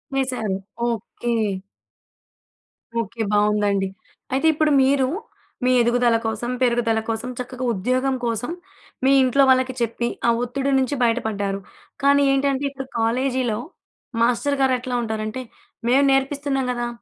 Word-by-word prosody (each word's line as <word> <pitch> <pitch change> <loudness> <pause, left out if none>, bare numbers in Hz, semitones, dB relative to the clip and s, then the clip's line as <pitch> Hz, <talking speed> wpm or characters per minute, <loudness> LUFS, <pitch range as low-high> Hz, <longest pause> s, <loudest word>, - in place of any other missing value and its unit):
వేసారు. 250 -7 -1 0.3
Okay. 235 +1 -4 1.7
Okay. 225 +2 -6
బావుందండి. 205 -2 +2 0.5
అయితే 275 +5 +2
ఇప్పుడు 310 0 +2
మీరూ, 265 -1 +3 0.6
మీ 255 - +4
ఎదుగుదల 240 -1 +3
కోసం, 225 +2 -2
పెరుగుదల 235 -2 +2
కోసం, 225 +3 -2
చక్కగా 255 0 -5
ఉద్యోగం 255 +7 0
కోసం, 235 +5 -2 0.5
మీ 270 - +5
ఇంట్లో 275 +2 +4
వాళ్ళకి 260 0 +3
చెప్పి, 235 +1 -1 0.2
ఆ - - +5
ఒత్తిడి 275 +3 -1
నుంచి 265 +2 0
బయటపడ్డారు. 210 -4 0 0.4
కానీ 280 0 +5
ఏంటంటే, 275 0 +1
ఇప్పుడు 270 -1 -7
కాలేజీలో, 245 0 0 0.6
మాస్టరు 250 +4 +2
గారెట్లా 255 -1 +1
ఉంటారంటే, 220 +2 -3 0.5
మేం 265 +3 +4
నేర్పిస్తున్నాం 270 0 0
గదా! 240 -1 -2
250 Hz, 115 wpm, -22 LUFS, 225-270 Hz, 1.7 s, మీ